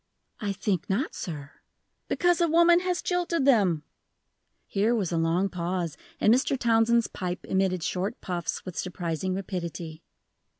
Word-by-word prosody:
"I 205 -3 -1
think 195 -1 -2
not, 230 - 0
sir." 145 -4 -6 0.6
"Because 350 0 +2
a 340 - +4
woman 340 +2 +6
has 360 0 -1
jilted 350 -5 0
them!" 195 - +4 0.8
Here 215 +4 +1
was 195 -7 -1
a 170 - 0
long 165 +4 +2
pause, 175 -3 -2 0.2
and 215 - +5
Mr. 270 +2 +2
Townsend's 235 -1 +3
pipe 180 0 -4
emitted 190 -2 0
short 190 +8 -2
puffs 175 -2 -4
with 185 -3 -7
surprising 180 0 -2
rapidity. 170 -4 -5
190 Hz, 140 wpm, -27 LUFS, 175-240 Hz, 0.8 s, woman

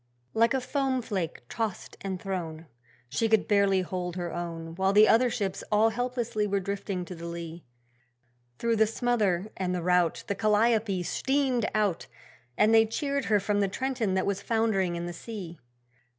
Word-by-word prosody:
Like 230 +3 +3
a 265 - 0
foam 260 -1 -1
flake 185 - -3
tossed 220 - -4
and 190 -2 -3
thrown, 170 -5 -4 0.4
She 225 - 0
could 220 -2 +3
barely 200 -2 +3
hold 180 -1 -4
her 175 -2 -4
own, 165 -1 -5
While 190 +3 +1
the 210 +1 +7
other 245 +3 +5
ships 195 -5 -2
all 215 +2 +5
helplessly 235 -2 -1
were 200 0 +1
drifting 195 -1 -3
to 180 - -7
the 170 0 -7
lee. 170 0 -7 0.9
Through 230 -1 +1
the 220 0 +4
smother 215 -5 0
and 180 -1 -1
the 175 - -3
rout 180 -2 +2
The - - -1
'Calliope' 215 -2 +2
steamed 265 +1 +1
out 205 -5 0 0.5
And 215 +2 +4
they 225 0 +6
cheered 280 +4 -2
her 210 -2 +3
from 205 +1 0
the 200 - +2
Trenton 230 -2 -1
that 190 - +1
was 200 -1 -1
foundering 215 -6 +1
in 170 0 -3
the 175 - -5
sea. 175 -4 -8
200 Hz, 175 wpm, -28 LUFS, 180-225 Hz, 0.9 s, the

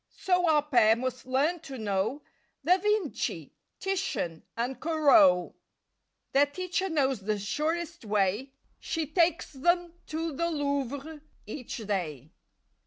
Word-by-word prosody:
So 360 -2 +2
our 300 -2 +4
pair 240 -7 +5
must 255 +1 -4
learn 290 +7 +1
to 275 -4 -8
know 215 +6 -1 0.4
Da 365 +2 +5
Vinci, 420 -5 -1 0.3
Titian 350 - -2 0.2
and 245 +2 -2
Corot. 300 - +4 0.8
Their 285 +1 +4
teacher 365 +5 -2
knows 270 - +1
the 210 +2 -1
surest 320 +10 -2
way: 210 +5 0 0.3
She 325 -1 -2
takes 335 +2 +1
them 345 +5 +1
to 325 +1 -3
the 335 +4 0
Louvre 285 0 -2 0.2
each 235 +4 -6
day. 155 - -3
285 Hz, 120 wpm, -29 LUFS, 230-335 Hz, 0.8 s, pair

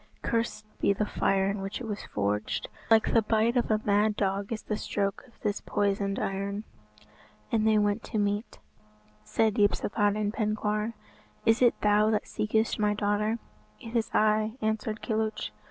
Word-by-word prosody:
Cursed 230 -2 -1
be 200 - +3
the 210 +2 -1
fire 195 -1 +1
in 200 0 -2
which 195 +1 -4
it 250 - -6
was 210 -2 -4
forged. 105 +1 -1 0.2
Like 225 -1 +4
the 230 - +6
bite 220 +2 +2
of 245 - +1
a 215 -1 +3
mad 210 +1 +3
dog 200 +1 -1
is 225 - -3
the 215 - -2
stroke 200 -1 -2
of 235 - -24
this 210 -2 -1
poisoned 200 -1 0
iron." 200 +2 -2 0.9
And 220 -1 +2
they 215 -1 +5
went 205 +1 +2
to - - -3
meat. 205 +2 -1 0.7
Said 215 - +1
Yspathaden 205 0 +1
Penkawr, 215 0 -1 0.5
"Is 225 +2 +4
it 240 -2 +4
thou 210 +1 +4
that 215 -1 +1
seekest 220 +1 0
my 210 0 +2
daughter?" 210 +2 0 0.4
"It 230 +1 -9
is 230 -1 +1
I," 215 +2 +2
answered 220 -1 -2
Kilhuch. 220 - -1
210 Hz, 165 wpm, -28 LUFS, 205-220 Hz, 0.9 s, the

